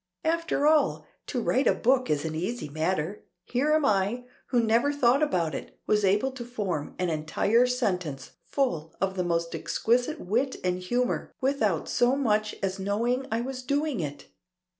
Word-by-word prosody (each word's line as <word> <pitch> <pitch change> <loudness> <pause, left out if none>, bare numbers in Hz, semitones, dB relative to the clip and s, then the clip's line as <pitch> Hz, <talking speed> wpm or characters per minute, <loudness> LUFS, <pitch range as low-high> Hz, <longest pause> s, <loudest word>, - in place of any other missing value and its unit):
After 330 -3 0
all 305 -1 +3 0.2
to 255 - -2
write 260 +3 +2
a - - +4
book 255 +1 +2
is 150 0 0
an 160 - -3
easy 185 +6 -3
matter; 160 +4 -2 0.2
here 265 +8 0
am 310 -1 +3
I, 210 +2 +1 0.2
who 245 - +2
never 230 +6 +3
thought 275 -1 +3
about 175 - +1
it, - - -7
was 210 -1 +2
able 205 +7 +2
to 260 -2 -7
form 200 -11 -3
an 180 -2 0
entire 200 +10 +2
sentence 180 - -2
full 170 - -2
of 190 0 0
the 180 - 0
most 170 -1 -1
exquisite 250 +7 0
wit 245 +8 0
and 180 0 0
humor 245 +7 -1
without 225 - +1
so 245 +2 +3
much 215 -6 +1
as 190 0 -1
knowing 235 +7 0
I 225 +1 0
was 255 +1 -5
doing 285 -1 -1
it. 145 -3 -5
230 Hz, 170 wpm, -27 LUFS, 180-260 Hz, 0.2 s, a